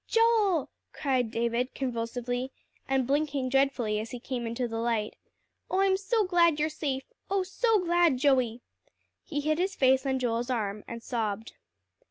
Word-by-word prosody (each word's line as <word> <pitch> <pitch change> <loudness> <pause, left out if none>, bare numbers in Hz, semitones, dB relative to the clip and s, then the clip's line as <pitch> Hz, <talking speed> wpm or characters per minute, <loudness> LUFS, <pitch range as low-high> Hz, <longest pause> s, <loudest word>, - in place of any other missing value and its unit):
"Joel!" 440 - +3 0.2
cried 260 -5 0
David 235 +2 -1
convulsively, 245 0 -3 0.4
and 265 -1 +2
blinking 280 -1 0
dreadfully 255 -5 +1
as 220 +1 -5
he 245 - -6
came 240 -1 -4
into 235 +2 -2
the 225 -1 -4
light. 230 -2 -1 0.5
"Oh, 380 - +1
I'm 390 -1 +4
so 410 +3 +1
glad 340 -4 +3
you're 305 +1 +1
safe 280 -3 -3 0.3
oh, 390 -1 +1
so 440 +4 +2
glad, 345 -5 +3
Joey!" 250 -3 +2 0.6
He 290 -5 -3
hid 310 +2 0
his 380 +1 0
face 265 0 +4
on 265 -1 +1
Joel's 240 -1 -1
arm, 210 -4 -2
and 235 0 -7
sobbed. 220 -2 -3
265 Hz, 160 wpm, -28 LUFS, 235-325 Hz, 0.6 s, I'm